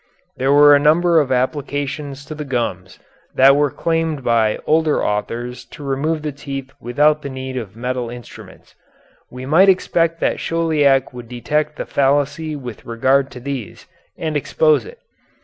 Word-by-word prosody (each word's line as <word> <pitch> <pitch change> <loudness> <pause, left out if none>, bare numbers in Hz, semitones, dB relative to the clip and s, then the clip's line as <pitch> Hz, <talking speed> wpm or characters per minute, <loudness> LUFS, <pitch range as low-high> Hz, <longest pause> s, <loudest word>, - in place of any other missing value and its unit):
There 135 +2 +1
were 145 0 +7
a - - +4
number 165 +3 +4
of 140 -3 0
applications 140 +2 -2
to 155 - -7
the 150 0 -6
gums 115 -9 -3 0.4
that 135 +1 +6
were 145 0 +2
claimed 165 -2 -2
by 115 -3 +2
older 155 -1 +2
authors 120 +4 -3
to 145 - -12
remove 150 +3 -1
the 150 - -2
teeth 135 -1 -7
without 150 +6 +2
the 140 - -6
need 130 0 -6
of 110 -5 -6
metal 125 0 -3
instruments. 120 -1 -12 0.6
We 125 +1 -8
might 170 +8 +5
expect 170 -3 +1
that - - 0
Chauliac 150 -6 +1
would 120 -2 -10
detect 150 +5 -2
the - - -5
fallacy 145 +3 0
with 125 -6 -8
regard 130 +4 +1
to 125 - -8
these 130 -4 -6 0.3
and 155 -2 -3
expose 155 +1 +2
it. 470 +2 -12
140 Hz, 160 wpm, -19 LUFS, 125-150 Hz, 0.6 s, were